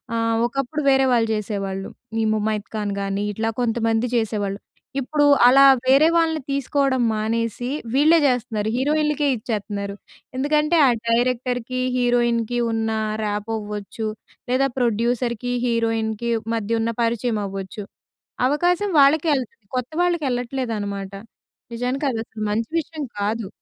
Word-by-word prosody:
ఆహ్, 230 0 +1
ఒకప్పుడు 275 +5 -2
వేరే 270 0 +4
వాళ్ళు 225 -2 +2
చేసేవాళ్ళు. 195 -2 -4 0.3
ఈ - - +1
ముమైత్ 215 0 -2
ఖాన్ 205 -2 -2
గాని 195 +1 -2
ఇట్లా 225 +2 -1
కొంతమంది 230 -1 +1
చేసేవాళ్ళు. 205 -3 -1 0.4
ఇప్పుడు 290 +3 +1 0.2
అలా 270 +2 +7 0.2
వేరే 275 +4 +6
వాళ్ళని 320 -2 +1
తీసుకోవడం 275 -1 +1
మానేసి, 230 +2 -2 0.2
వీళ్ళే 310 +5 +5
చేస్తున్నారు. 230 -4 -1
హీరోయిన్‌లకే 300 +1 +1
ఇచ్చేతున్నారు. 205 -2 -4 0.4
ఎందుకంటే, 300 +4 +2
ఆ - - +5 0.2
డైరెక్టర్‌కి, 250 +1 0 0.2
హీరోయిన్‌కి 240 -1 +1
ఉన్న 225 0 -1 0.3
ర్యాపో 210 +1 -2
అవ్వచ్చు. 210 +1 -5 0.4
లేదా, 270 +2 +3
ప్రొడ్యూసర్‌కి, 240 +1 0
హీరోయిన్‌కి 230 -1 0 0.2
మధ్య 225 +1 -1
ఉన్న 230 +1 -1
పరిచయం 230 -1 0
అవ్వచ్చు. 195 +2 -6 0.7
అవకాశం 355 +7 +1
వాళ్ళకే 295 +4 +4
ఎళ్తుంది 230 -4 -7
కొత్త 250 +4 -3
వాళ్ళకి 345 -3 +1
ఎళ్ళట్లేదు 245 0 -2
అనమాట. 200 -1 -5 0.6
నిజానికి 250 +4 -2
అది 225 - -2
అసలు 220 -1 -9
మంచి 220 +2 -1
విషయం 310 -1 -6 0.2
కాదు. 210 0 -1
235 Hz, 125 wpm, -22 LUFS, 215-265 Hz, 0.7 s, అలా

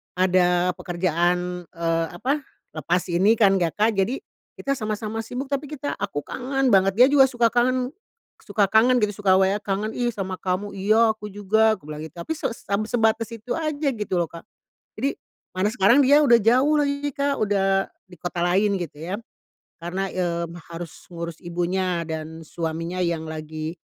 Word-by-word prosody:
ada 180 -1 +3
pekerjaan, 175 0 -1
eee, 165 -1 -1
apa, 275 +10 0 0.4
lepas 175 +3 0
ini 195 +6 +4
kan 195 -4 +4
ya 170 - +2
Kak. 215 +2 +3
Jadi, 220 +8 +1 0.4
kita 275 - -3
sama-sama 215 0 -3
sibuk 250 +4 -5
tapi 280 +1 -1
kita 290 -1 -4
aku 195 -8 -3
kangen 265 0 -1
banget, 195 -1 +4
dia 250 +2 +8
juga 270 -2 +6
suka 240 -3 +1
kangen 250 +1 +1 0.5
suka 205 -1 +1
kangen 245 +3 +5
gitu, 205 0 -1
suka 190 - +6
WA 190 +1 +3
"Kangen 205 +2 -2
ih, 240 -1 +1
sama 190 -2 -4
kamu." 185 +2 -2
"Iya, 215 +4 +4
aku 210 - -10
juga," 215 +2 +3
bilang 150 +1 -8
gitu, 160 +2 -13
tapi - - -2
seb 210 -5 -2
sebatas 225 -1 +1
itu 230 +2 -5
aja, 305 -2 -1
gitu 210 -6 -5
loh 170 - 0
Kak. 170 - -10 0.6
Jadi 275 +4 -1 0.4
mana 185 +2 +1
sekarang 235 +3 +5
dia 290 +3 +6
udah 240 -4 +7
jauh 260 +8 +4
lagi 285 0 -1
Kak, 280 0 0
udah 195 -1 +1 0.2
di 180 - -14
kota 175 -1 -4
lain, 195 +3 +2
gitu 165 -4 -6
ya. 180 +5 -3 0.7
Karena, 185 +3 -2
eee, 170 -2 -1 0.3
harus 165 -1 -9
ngurus 170 -1 -6
ibunya 175 0 -1
dan 160 0 -6
suaminya 165 +2 -4
yang 170 -2 -1
lagi 155 +1 -5
195 Hz, 170 wpm, -24 LUFS, 175-235 Hz, 0.7 s, dia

